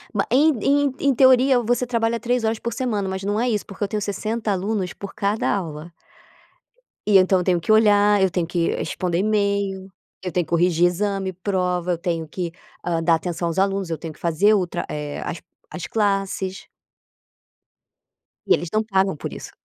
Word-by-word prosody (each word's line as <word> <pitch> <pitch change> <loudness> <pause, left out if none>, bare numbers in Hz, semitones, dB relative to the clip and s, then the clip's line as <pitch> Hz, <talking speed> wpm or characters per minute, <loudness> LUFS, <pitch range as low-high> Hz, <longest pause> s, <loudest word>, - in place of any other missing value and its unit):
Ba 195 - 0
em 295 +6 +4
em 285 -1 +2
em 280 -2 +2
teoria 260 0 +5
você 245 +1 0
trabalha 230 -1 0
3 245 +1 0
horas 220 0 0
por 235 - -3
semana, 210 -7 -2
mas 190 0 -4
não 205 +2 0
é 245 +1 +1
isso 210 -3 -1
porque 200 +1 -6
eu - - -4
tenho 210 0 -3
60 215 +2 -2
alunos 195 -1 -2
por 200 - -8
cada 210 +1 0
aula. 165 -3 -3 1.2
E 200 -2 +6
então 185 0 +4
eu 180 - -1
tenho 180 -2 +2
que 170 - -1
olhar, 205 -2 +5
eu 190 - +4
tenho 170 -3 -1
que 170 -1 0
responder 175 -2 -2
email, 200 -2 0 0.3
eu 180 -2 -4
tenho 175 -1 0
que - - -23
corrigir 170 0 +3
exame, 195 +1 -2
prova, 180 -1 -1
eu 170 - 0
tenho 170 -2 -2
que, 170 +2 -5 0.3
hã, 165 -2 0
dar 165 0 +4
atenção 170 0 -3
aos 165 - -2
alunos, 195 -2 0
eu 165 - -2
tenho 160 -2 -7
que - - -22
fazer 170 +6 +3
outra, 185 -4 -1
eh, 150 -1 -5
as 170 - -5 0.3
as 180 - -6
classes. 195 -2 -1 1.8
E - - +6
eles 175 - -1
não 215 +1 +2
pagam 195 -3 +1
por - - -6
isso. - - -9
195 Hz, 190 wpm, -22 LUFS, 175-215 Hz, 1.8 s, E